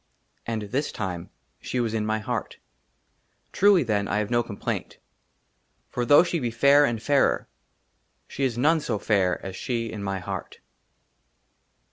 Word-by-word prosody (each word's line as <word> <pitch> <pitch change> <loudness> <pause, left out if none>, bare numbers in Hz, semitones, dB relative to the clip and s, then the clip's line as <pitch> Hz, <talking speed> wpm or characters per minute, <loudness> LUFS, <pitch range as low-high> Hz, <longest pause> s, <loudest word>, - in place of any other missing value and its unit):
AND 115 -2 -2
THIS 140 +4 -1
TIME 90 -6 -5 0.3
SHE 125 - -3
WAS 115 -2 -1
IN 110 -1 -1
MY 110 0 +1
HEART. 110 - -4 0.9
TRULY, 200 -4 +5
THEN, 105 -4 0
I - - 0
HAVE 105 +1 -2
NO 120 0 +3
COMPLAINT, 110 -4 -5 0.9
FOR 120 - -2
THOUGH 145 +3 +8
SHE 170 -1 -1
BE 120 -4 -1
FAIR 140 +5 +5
AND 115 -4 -2
FAIRER, 145 -2 +2 0.8
SHE 140 - -4
IS 120 -3 -1
NONE 155 +6 +3
SO 120 -7 -2
FAIR 100 -3 +1
AS 95 -1 -6
SHE 115 +1 -3
IN 105 - -6
MY 95 -1 -2
HEART. 90 - -6
115 Hz, 155 wpm, -25 LUFS, 105-140 Hz, 0.9 s, THOUGH